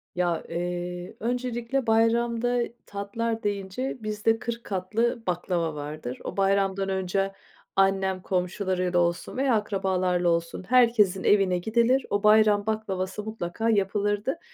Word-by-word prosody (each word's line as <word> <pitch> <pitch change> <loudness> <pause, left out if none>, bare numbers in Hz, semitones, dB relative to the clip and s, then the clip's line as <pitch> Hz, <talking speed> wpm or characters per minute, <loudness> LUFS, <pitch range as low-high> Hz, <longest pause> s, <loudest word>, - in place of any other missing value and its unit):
Ya, 175 -2 0
eee, 175 +2 -4
öncelikle 245 +1 -2
bayramda 235 +2 +2 0.3
tatlar 225 +3 -3
deyince 205 +6 -3
bizde 215 +1 0
40 235 0 -4
katlı 220 +5 -1
baklava 175 -3 -1
vardır. 145 -3 -6
O, - - -6
bayramdan 195 0 +1
önce 190 +1 -1 0.4
annem, 195 -1 +2
komşularıyla 180 -1 0
olsun 170 +7 -1
veya 265 -3 +2
akrabalarla 185 -4 0
olsun, 170 +2 -1
herkesin 230 -7 +4
evine 195 -3 +3
gidilir. 235 +7 +2
O 205 0 0
bayram 210 -1 +5
baklavası 205 -2 -2
mutlaka 220 +1 -3
yapılırdı. 205 - 0
200 Hz, 115 wpm, -26 LUFS, 180-225 Hz, 0.4 s, bayram